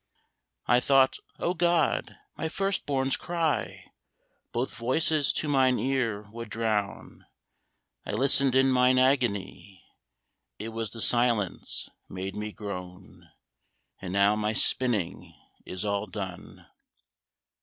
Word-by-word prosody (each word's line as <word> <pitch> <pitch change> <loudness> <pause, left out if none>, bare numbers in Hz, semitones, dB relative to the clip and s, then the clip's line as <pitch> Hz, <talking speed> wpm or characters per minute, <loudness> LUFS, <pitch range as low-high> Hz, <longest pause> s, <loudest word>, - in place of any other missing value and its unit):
I 120 - +4
thought, 135 +1 +3 0.2
O 175 - 0
God! 170 -3 +1 0.2
my 160 - -3
first 195 +3 -2
born's 135 -2 +1
cry 165 -3 -2 0.7
Both 120 +3 -2
voices 140 +5 +1
to 155 - -2
mine 130 -3 +3
ear 115 -4 -1
would 115 0 -7
drown: 105 -2 -3 0.8
I - - -5
listened 135 -1 +3
in 135 0 +5
mine 125 0 +4
agony, 115 -7 0 0.7
It 110 +2 -5
was 115 -1 -4
the 115 +2 -8
silence 120 -5 +1 0.2
made 95 +1 -5
me 105 0 -4
groan! 95 -4 -9 0.7
And 90 - -5
now 100 +2 +4
my 105 0 -1
spinning 110 -6 0 0.3
is 95 +3 -5
all 100 0 -1
done. 95 -2 -8
120 Hz, 115 wpm, -28 LUFS, 100-135 Hz, 0.8 s, in